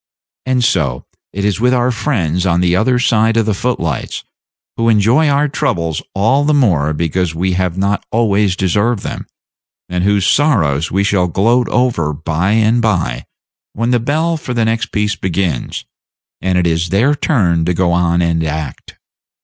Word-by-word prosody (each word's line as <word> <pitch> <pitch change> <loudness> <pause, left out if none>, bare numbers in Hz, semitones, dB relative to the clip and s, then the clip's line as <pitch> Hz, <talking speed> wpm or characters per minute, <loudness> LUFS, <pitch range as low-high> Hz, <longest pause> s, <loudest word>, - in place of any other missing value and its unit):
And 130 -1 +1
so 70 - 0 0.3
it 100 +1 -3
is 105 0 0
with 125 +2 +2
our 125 +1 +1
friends 90 - -1
on 85 -1 +2
the 90 -1 +2
other 125 +6 +2
side 115 -2 +2
of 115 - +2
the 110 - 0
foot 125 +5 -2
lights, 80 -5 -4 0.5
who 115 0 +1
enjoy 115 +8 +3
our 145 +1 +2
troubles 90 - -2
all 115 +9 +2
the 150 +1 +2
more 85 - +2
because 85 +2 -2
we 95 +3 -1
have 90 -1 -1
not 100 +1 0
always 105 -4 +1
deserved 100 +4 0
them, - - -6 0.6
and 90 0 -2
whose 100 -1 +2
sorrows 85 - +2
we 95 +2 0
shall 100 -3 +1
gloat 115 +8 +1
over 115 -12 0
by 80 +6 -1
and 110 +2 +2
by, 85 - -1 0.5
when 115 +3 -1
the 125 - +2
bell 160 +7 0
for 125 -5 -6
the 115 -1 +1
next 115 +1 -1
piece 105 0 -1
begins, 90 -7 -3 0.6
and 95 -1 0
it 90 - +1
is 85 0 0
their 115 - +2
turn 90 - +1
to 90 - 0
go 90 0 +1
on 85 0 +1
and 85 -1 0
act. 75 -3 -5
100 Hz, 175 wpm, -15 LUFS, 85-120 Hz, 0.6 s, enjoy